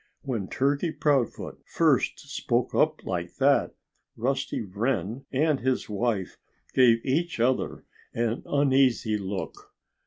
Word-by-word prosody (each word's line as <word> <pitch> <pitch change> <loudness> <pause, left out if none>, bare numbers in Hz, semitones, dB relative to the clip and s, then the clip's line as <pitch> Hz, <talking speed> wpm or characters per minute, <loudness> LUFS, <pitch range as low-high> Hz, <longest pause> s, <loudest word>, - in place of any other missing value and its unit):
When 115 -8 -3
Turkey 140 - 0
Proudfoot 140 -7 0
first - - +2
spoke - - -1
up - - +1
like 85 -1 -3
that, 140 +1 +2 0.4
Rusty 135 0 -1
Wren 110 +3 -2
and 150 +1 +2
his 130 -2 -1
wife 105 -2 -1 0.3
gave 115 -3 +4
each 165 +2 0
other 125 +2 0 0.3
an 115 0 -1
uneasy 130 -6 +2
look. 95 0 -6
125 Hz, 115 wpm, -27 LUFS, 110-135 Hz, 0.4 s, gave